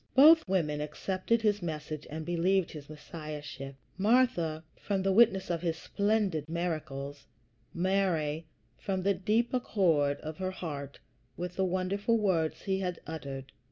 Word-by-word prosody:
Both 310 - +8
women 150 -6 +1
accepted 185 +9 -1
his 205 -2 +2
message 155 -2 -5
and 155 +1 -5
believed 175 +2 +2
his 150 -2 -9
Messiahship 150 -3 -7 0.2
Martha, 200 -8 +3
from 195 -2 -2
the 195 - +2
witness 195 -3 +4
of 170 -2 -1
his 165 -2 -1
splendid 200 -6 0
miracles; 145 -5 -3 0.4
Mary, 170 -4 0 0.3
from 190 -2 -2
the 200 +1 +3
deep 215 +6 +1
accord 165 - +2
of 155 0 -6
her 185 0 -2
heart 145 -7 -6 0.4
with 180 0 -4
the 190 - +1
wonderful 190 +5 +1
words 180 -7 0
he 190 -1 0
had 180 -3 -2
uttered. 135 -4 -6
175 Hz, 140 wpm, -30 LUFS, 155-195 Hz, 0.4 s, Both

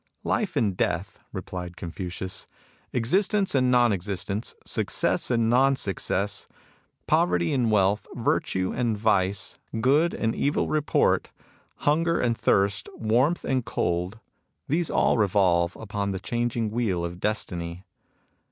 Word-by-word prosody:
" - - -47
Life 210 -8 -3
and 110 -9 +1
Death," - - -2
replied 90 -1 -6
Confucius, 90 +1 -5 0.2
" - - -34
ex 120 -1 -1
istence 200 0 +2
and 130 -2 +3
non 120 -2 +4
existence, 100 +2 -3
success - - 0
and 115 -2 +2
non 135 +4 +4
success, 100 -3 -1 0.6
poverty 90 -1 +2
and 125 -4 +2
wealth, 105 0 +2
virtue 95 0 0
and 120 -3 0
vice, 95 -2 0 0.2
good 145 +8 +3
and 115 0 0
evil 145 - 0
report, 155 -1 +1 0.5
hunger 165 +3 +2
and 120 -2 +1
thirst, 100 -2 +1
warmth 125 +10 +1
and 130 -2 0
cold, 90 -1 -2 0.2
— 75 - -51
these 165 +3 0
all 125 - +2
revolve 90 -4 +2
upon 100 -2 -3
the 95 -1 -3
changing 120 0 -1
wheel 105 -7 0
of 85 +1 -6
Destiny. 90 -4 -3
110 Hz, 135 wpm, -26 LUFS, 95-125 Hz, 0.6 s, non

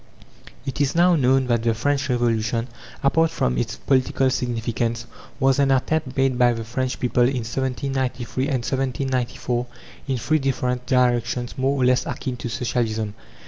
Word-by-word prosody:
It 135 +1 -3
is 140 +1 +1
now 175 +1 +5
known 130 -2 +3
that 120 -2 +1
the 115 -1 +1
French 140 +4 0
Revolution, 115 -1 0 0.4
apart 160 +4 +3
from 65 - 0
its - - -2
political 130 0 +1
significance, 115 -1 -2 0.3
was 135 0 +3
an 140 -1 +3
attempt 135 +1 0
made 135 -2 +2
by 120 -1 +5
the 115 -1 -4
French 125 +3 -3
people, 125 0 +1
in 125 -1 +2
1793 130 0 -2
and 145 - -1
1794, 130 -2 -1 0.4
in 135 -2 0
three 155 +7 +1
different 125 -2 -1
directions 120 -2 +1
more 135 +1 0
or 125 - +3
less 125 0 +2
akin 130 -2 -3
to 120 - -5
Socialism. 110 -2 -1
125 Hz, 155 wpm, -23 LUFS, 120-135 Hz, 0.4 s, now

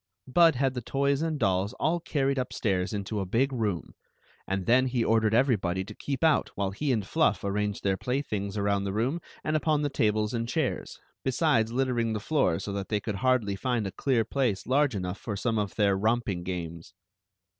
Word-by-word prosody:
Bud 165 +4 +5
had 135 +1 +1
the 125 - -4
toys 140 +4 0
and 160 -1 -1
dolls 95 -2 +1
all 165 +6 0
carried 140 -4 0
upstairs 95 -7 -1
into 105 0 -3
a 95 - -1
big 130 +8 +1
room, 105 -8 -2 0.5
and 95 -1 -2
then 130 +2 +4
he 125 -2 0
ordered 110 -1 +3
everybody 100 -8 +2
to 105 - -9
keep 140 +7 -4
out 160 -2 +3
while 100 -1 -1
he 140 +8 -1
and 110 -5 0
Fluff - - +1
arranged 105 +1 -1
their 95 -1 +1
playthings 110 -6 -2
around 100 -1 +1
the 95 - -2
room 130 +11 0 0.2
and 155 - 0
upon 155 -1 +1
the 145 - +1
tables 105 -2 +1
and 115 0 -2
chairs, - - -2 0.3
besides 130 -4 +2
littering 120 -3 0
the 110 - -2
floor 120 - +1
so 100 - -5
that 100 -1 -4
they 105 - +1
could 105 -1 -4
hardly 125 -5 +1
find 120 +1 -1
a 95 - -3
clear 115 +3 +1
place 120 -5 -1
large 135 0 +2
enough 90 0 -3
for 105 - -4
some 110 +2 0
of 100 -2 -3
their 100 -3 +3
romp 115 +4 +1
ing 90 -4 -2
games. 85 -2 -6
110 Hz, 200 wpm, -28 LUFS, 100-130 Hz, 0.5 s, Bud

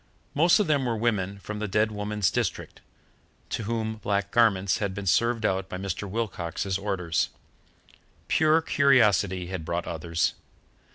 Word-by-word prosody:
Most 170 +7 +4
of 210 - +2
them 145 -5 +1
were 115 -2 -1
women 100 -4 -1
from 105 +2 -7
the 105 - -2
dead 105 +2 +1
woman's 105 -2 -1
district, - - -3 0.7
to 110 - -3
whom 110 0 -2
black 100 -1 -1
garments 100 -5 +3
had 100 -3 -2
been 100 0 -5
served 115 +5 +2
out 95 -1 0
by 90 - -5
Mr. 100 +1 -4
Wilcox's 95 -3 -3
orders. 90 -5 -1 1.0
Pure 160 +1 +3
curiosity 105 - +3
had 95 -4 -4
brought 85 +1 -3
others. 85 +1 -1
105 Hz, 150 wpm, -26 LUFS, 95-115 Hz, 1.0 s, Most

